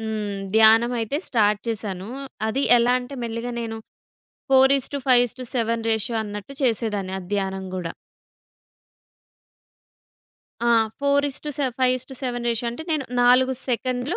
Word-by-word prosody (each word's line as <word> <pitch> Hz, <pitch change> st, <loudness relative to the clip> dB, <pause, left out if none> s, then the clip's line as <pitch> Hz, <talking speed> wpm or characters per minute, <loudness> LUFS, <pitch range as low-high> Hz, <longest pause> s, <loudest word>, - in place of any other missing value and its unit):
హ్మ్. 215 Hz, -2 st, -3 dB, 0.2 s
ధ్యానమయితే 225 Hz, +3 st, +4 dB
స్టార్ట్ 210 Hz, -3 st, +2 dB
చేశాను. 200 Hz, -3 st, -4 dB, 0.4 s
అది 270 Hz, +5 st, -1 dB, 0.2 s
ఎలా 240 Hz, +1 st, +3 dB
అంటే 250 Hz, +3 st, -8 dB
మెల్లిగా 230 Hz, +1 st, -4 dB
నేను 225 Hz, -1 st, -4 dB, 0.8 s
4 265 Hz, 0 st, +6 dB
is 265 Hz, -, -4 dB
to -, -, 0 dB
5 245 Hz, -1 st, +6 dB
is -, -, -10 dB
to -, -, -5 dB
7 230 Hz, -1 st, 0 dB
ratio 220 Hz, +1 st, -1 dB
అన్నట్టు 210 Hz, +6 st, -7 dB
చేసేదాన్ని 215 Hz, -6 st, 0 dB
ఆ -, -, -9 dB
ధ్యానం 190 Hz, -1 st, -2 dB
గూడా. 175 Hz, -3 st, -4 dB, 2.7 s
ఆ! -, -, +3 dB, 0.3 s
4 280 Hz, 0 st, +2 dB
ఇస్ 270 Hz, -, -6 dB
టు 300 Hz, -, -3 dB
సె 285 Hz, -, 0 dB, 0.2 s
5 255 Hz, 0 st, +4 dB
ఇస్ 255 Hz, 0 st, -8 dB
టు -, -, -7 dB
7 245 Hz, -1 st, -3 dB
రేషియో 235 Hz, 0 st, -1 dB
అంటే 240 Hz, +7 st, -7 dB
నేను 290 Hz, -3 st, 0 dB, 0.2 s
4 255 Hz, +2 st, +5 dB
సెకండ్‌లు 250 Hz, +5 st, -1 dB
235 Hz, 155 wpm, -23 LUFS, 215-255 Hz, 2.7 s, 4